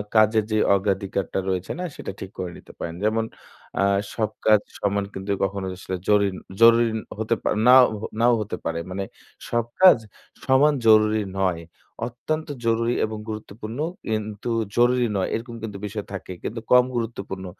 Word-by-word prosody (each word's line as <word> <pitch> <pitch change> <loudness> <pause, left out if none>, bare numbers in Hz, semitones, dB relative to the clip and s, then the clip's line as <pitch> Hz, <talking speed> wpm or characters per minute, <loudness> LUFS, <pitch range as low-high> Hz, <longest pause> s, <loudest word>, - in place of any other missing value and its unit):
কাজের 110 0 +5
যে 110 - +2 0.2
অগ্রাধিকারটা 95 -1 -1
রয়েছে 90 -1 -2
না 180 - -2
সেটা - - -6
ঠিক 95 - -7
করে 90 -1 -4
নিতে - - -14
পারেন। 85 0 -4
যেমন 110 +1 +1 0.5
আ - - +4 0.3
সব 110 -2 0 0.2
কাজ 110 -1 +6 0.2
সমান 100 0 0
কিন্তু 95 +1 -4
কখনো 95 0 -2
আসলে 95 0 -5
জরিন 100 -2 +3 0.3
জরুরি 115 0 +7 0.3
হতে 110 +1 +1
পা - - -1 0.2
নাও 130 0 +9 0.4
নাও 120 0 +5
হতে 105 - -4
পারে। 85 0 -1
মানে 95 +1 -3 0.5
সব 120 -1 +1 0.2
কাজ 185 -6 +9 0.5
সমান 140 +3 +5
জরুরি 110 -1 +5 0.2
নয়। 90 -3 0 0.4
অত্যন্ত 155 +7 -4 0.2
জরুরি 115 +1 +2
এবং 110 0 -5
গুরুত্বপূর্ণ 110 +2 -7 0.3
কিন্তু 110 +1 -3 0.3
জরুরি 125 0 +4
নয় 95 - 0
এরকম 115 +1 -6
কিন্তু 105 -3 -5
বিষয় 105 0 -5
থাকে 95 -1 -6
কিন্তু 115 +1 -4
কম 125 0 +7
গুরুত্বপূর্ণ। 100 -5 -4
110 Hz, 155 wpm, -24 LUFS, 100-115 Hz, 0.5 s, নাও